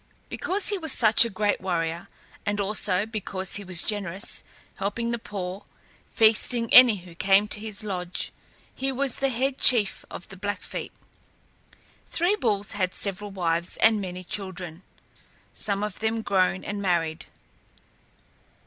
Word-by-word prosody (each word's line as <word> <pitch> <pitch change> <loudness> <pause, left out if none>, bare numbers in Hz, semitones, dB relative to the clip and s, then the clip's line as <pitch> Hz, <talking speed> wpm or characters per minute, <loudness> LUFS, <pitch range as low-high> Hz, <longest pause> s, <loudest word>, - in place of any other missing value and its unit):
Because 390 +3 -1
he 405 -2 -1
was 320 -4 -2
such 225 -2 +5
a - - -2
great 205 0 0
warrior, 170 0 -2 0.4
and 205 0 -1
also 200 -1 +2
because 200 -4 -3
he 205 - -6
was 180 -2 +2
generous, 200 -1 -4 0.3
helping 230 +4 -2
the 235 - -1
poor, 195 -3 -6 0.4
feasting 230 +1 +3
any 250 -3 +10
who 175 -1 -13
came 195 +4 +3
to 210 - -4
his 215 0 -7
lodge, 180 -4 -3 0.4
he 270 +1 -2
was 270 -1 -1
the 275 0 +1
head 265 +2 -1
chief 225 -6 +4
of 175 - -9
the 195 - -11
Blackfeet. 205 +2 -5 1.2
Three 350 +5 +1
Bulls 205 - 0
had 185 -2 -1
several 205 +1 -1
wives 170 -3 -1
and 220 -2 +4
many 185 -1 -6
children, 185 -3 -5 0.7
some 200 -1 -2
of 210 -2 -4
them 225 0 -1
grown 190 -2 +1
and 205 0 -4
married. 165 -4 -1
205 Hz, 145 wpm, -26 LUFS, 185-225 Hz, 1.2 s, any